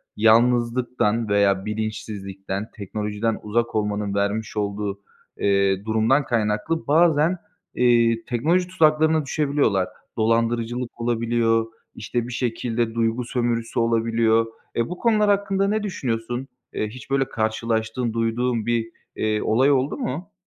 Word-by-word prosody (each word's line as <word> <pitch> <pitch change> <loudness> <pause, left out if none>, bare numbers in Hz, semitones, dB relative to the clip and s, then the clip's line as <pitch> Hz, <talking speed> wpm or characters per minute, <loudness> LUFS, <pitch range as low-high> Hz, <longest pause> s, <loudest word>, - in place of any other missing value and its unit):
yalnızlıktan 115 0 +2
veya 100 -1 +2
bilinçsizlikten, 105 -2 -4
teknolojiden 105 +2 -3
uzak 115 +2 -1
olmanın 105 -1 -1
vermiş 100 +2 -1
olduğu, 100 -1 -2 0.4
eee, 100 0 +1
durumdan 110 +6 +2
kaynaklı 110 +8 -1
bazen, 160 +2 +4 0.4
eee, 115 -2 +3
teknoloji 165 +9 +1
tuzaklarına 160 -3 +3
düşebiliyorlar. 140 - +1 0.3
Dolandırıcılık 115 +2 0
olabiliyor, 115 -1 +1 0.3
işte, 115 +2 -3
bir 125 - -6
şekilde 115 -1 -2
duygu 115 +1 0
sömürüsü 120 -1 -1
olabiliyor. 115 -1 +2 0.3
Eee, 115 - 0
bu 180 - -5
konular 215 -2 +2
hakkında 195 -1 +1
ne 215 +1 0
düşünüyorsun? 125 - -3 0.3
Eee, 105 - -1
hiç 130 +5 -11
böyle 135 -1 +1
karşılaştığın, 110 +1 -1
duyduğun 115 0 0
bir, 115 -1 0 0.3
eee, 110 -1 0
olay 130 +6 +3
oldu 135 +1 +1
mu? 175 +10 -4
115 Hz, 115 wpm, -23 LUFS, 110-130 Hz, 0.4 s, bazen